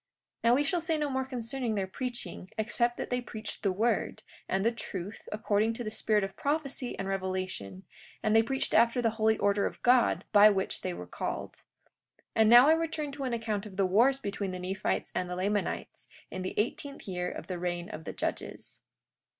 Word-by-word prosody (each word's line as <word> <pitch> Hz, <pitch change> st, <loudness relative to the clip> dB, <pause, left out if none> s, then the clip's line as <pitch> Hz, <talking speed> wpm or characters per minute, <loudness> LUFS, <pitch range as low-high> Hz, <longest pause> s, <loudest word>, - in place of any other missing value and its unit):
43:2 230 Hz, -, +5 dB
Now 240 Hz, -, +6 dB
we 285 Hz, -, +3 dB
shall 345 Hz, +4 st, 0 dB
say 325 Hz, -1 st, 0 dB
no 295 Hz, -2 st, -1 dB
more 265 Hz, 0 st, 0 dB
concerning 245 Hz, -2 st, -3 dB
their 195 Hz, -2 st, 0 dB
preaching, 235 Hz, -2 st, -5 dB
except 235 Hz, +2 st, +1 dB
that -, -, -5 dB
they 250 Hz, 0 st, +1 dB
preached 220 Hz, -3 st, -7 dB
the 200 Hz, -, +2 dB
word, 220 Hz, +4 st, 0 dB, 0.3 s
and 195 Hz, +2 st, +1 dB
the 230 Hz, -, +4 dB
truth, 205 Hz, -3 st, -7 dB
according 215 Hz, +1 st, +1 dB
to 240 Hz, -, -4 dB
the 215 Hz, -, -4 dB
spirit 215 Hz, -1 st, +2 dB
of 195 Hz, 0 st, -4 dB
prophecy 280 Hz, -3 st, -2 dB
and 195 Hz, -, -3 dB
revelation; 185 Hz, -, -3 dB, 0.4 s
and 215 Hz, 0 st, +3 dB
they 225 Hz, -, +8 dB
preached 265 Hz, +4 st, -1 dB
after 235 Hz, +2 st, +5 dB
the 230 Hz, -2 st, +2 dB
holy 220 Hz, 0 st, +2 dB
order 200 Hz, 0 st, +2 dB
of -, -, -8 dB
God 245 Hz, 0 st, +4 dB
by 210 Hz, 0 st, +8 dB
which 195 Hz, -2 st, -1 dB
they -, -, -2 dB
were 90 Hz, +1 st, -7 dB
called. 90 Hz, -, -4 dB, 0.6 s
43:3 -, -, -33 dB
And 220 Hz, -1 st, +6 dB
now 240 Hz, +3 st, +9 dB
I 315 Hz, -, +7 dB
return 320 Hz, -3 st, -1 dB
to 275 Hz, -1 st, -5 dB
an 250 Hz, -, -1 dB
account 220 Hz, -3 st, -2 dB
of 190 Hz, -2 st, -12 dB
the 195 Hz, -, +3 dB
wars 235 Hz, +9 st, +4 dB
between 200 Hz, -6 st, -3 dB
the 185 Hz, -, -4 dB
Nephites 185 Hz, +2 st, -2 dB
and 180 Hz, -, -2 dB
the 180 Hz, -, -3 dB
Lamanites, 200 Hz, +2 st, -2 dB, 0.2 s
in 185 Hz, -, -4 dB
the 185 Hz, -, -4 dB
eighteenth 275 Hz, +5 st, -2 dB
year 180 Hz, -1 st, -2 dB
of -, -, -7 dB
the 180 Hz, -2 st, -4 dB
reign 175 Hz, 0 st, -2 dB
of 155 Hz, 0 st, -8 dB
the -, -, -5 dB
judges. -, -, -4 dB
220 Hz, 210 wpm, -30 LUFS, 195-245 Hz, 0.6 s, now